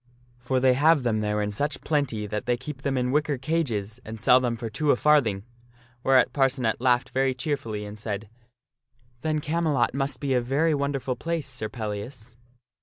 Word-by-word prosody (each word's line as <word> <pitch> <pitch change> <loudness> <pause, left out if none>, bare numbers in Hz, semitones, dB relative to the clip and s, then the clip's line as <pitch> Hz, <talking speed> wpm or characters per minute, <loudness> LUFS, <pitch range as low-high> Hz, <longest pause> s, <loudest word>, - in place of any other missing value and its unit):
For 130 +1 0
they 130 0 +4
have 150 +2 +4
them 115 -3 +1
there 105 0 0
in 105 - -2
such 145 +9 -2
plenty 140 -9 -1
that 105 +2 -4
they 120 0 +2
keep 145 0 -8
them 135 -1 -1
in 125 0 0
wicker 150 0 +1
cages, 125 -7 -2
and 110 +1 -8
sell 125 +4 +6
them 120 -2 -1
two 115 -1 -5 0.2
for - - +7
a - - +2
farthing." 125 -11 +3 0.6
Whereat 130 0 +4
Parcenet 130 -5 +1
laughed 125 0 +2
very 130 0 +1
cheerfully, 125 -7 -3
and 105 +1 -9
said, 105 0 -4 0.5
" 120 -1 -38
Then 155 0 0
Camelot 155 -4 +1
must 135 +1 -2
be 140 -2 -1
a 125 - +3
very 145 +7 +1
wonderful 140 -2 -1
place, 165 -2 -2
Sir 125 -5 -4
Pellias." 110 +2 -6
125 Hz, 185 wpm, -26 LUFS, 110-140 Hz, 0.6 s, for